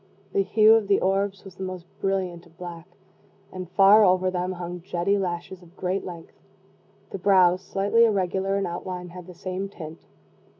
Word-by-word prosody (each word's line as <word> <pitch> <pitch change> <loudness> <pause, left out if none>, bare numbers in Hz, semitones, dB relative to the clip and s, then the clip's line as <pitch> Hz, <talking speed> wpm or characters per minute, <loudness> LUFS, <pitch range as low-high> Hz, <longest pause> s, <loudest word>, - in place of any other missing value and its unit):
The 195 - +3
hue 215 +2 +5
of 225 -3 +3
the 200 - +3
orbs 195 +1 0
was 195 - -10
the 190 - -5
most 185 -2 -6
brilliant 185 -3 -2
of 165 - -25
black, 175 -2 -8 0.6
and, 185 -2 -7
far 200 +3 +6
over 185 -1 +3
them, 180 0 -2
hung 175 0 -6
jetty 180 +2 0
lashes 180 -1 -4
of 175 +1 -19
great 185 +2 -2
length. 170 -3 -9 0.8
The 195 - -5
brows, 185 -1 +4
slightly 200 +5 +2
irregular 195 -2 0
in 200 - -1
outline, 180 +1 -5
had 180 0 -11
the 180 - -11
same 185 +2 -4
tint. 160 -4 -10
185 Hz, 175 wpm, -25 LUFS, 175-195 Hz, 0.8 s, far